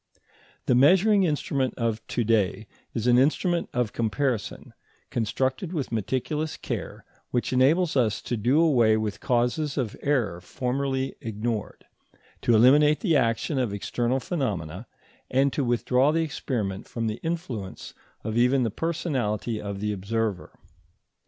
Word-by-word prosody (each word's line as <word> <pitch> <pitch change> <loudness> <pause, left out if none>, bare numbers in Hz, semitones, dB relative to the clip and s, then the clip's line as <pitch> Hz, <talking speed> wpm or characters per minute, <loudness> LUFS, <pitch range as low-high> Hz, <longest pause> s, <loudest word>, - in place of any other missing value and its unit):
The - - +3
measuring 190 - +5
instrument 140 -4 -1
of 115 -2 -1
to 120 - -1
day 110 -2 +1 0.3
is 115 - -2
an 125 0 +5
instrument 170 +5 +1
of 120 -4 -1
comparison 115 0 -2 0.4
constructed 130 - -1
with 145 -8 -3
meticulous 130 +8 -2
care, - - -5 0.2
which 125 +1 -1
enables 150 +7 +3
us 115 -4 +2
to 120 - -2
do 120 +7 +2
away 120 -10 +4
with 105 -2 -3
causes 125 +4 0
of 120 -6 -2
error 115 -12 0
formerly 135 +5 -2
ignored, 110 -1 -4 0.6
to 120 - +3
eliminate 145 +6 +5
the 170 -7 +2
action 130 +2 +1
of 115 -6 -1
external 120 +5 -1
phenomena, 105 - -3 0.4
and 135 +1 +2
to 145 - 0
withdraw 125 +3 +2
the 165 +1 +1
experiment 115 -10 -3
from 115 -1 -4
the 110 0 -2
influence 135 - -5 0.3
of 110 0 -3
even 125 +2 +3
the 115 - -1
personality 120 - -2
of 100 -1 -5
the 105 0 -1
observer. 105 0 -2
125 Hz, 140 wpm, -26 LUFS, 110-140 Hz, 0.6 s, measuring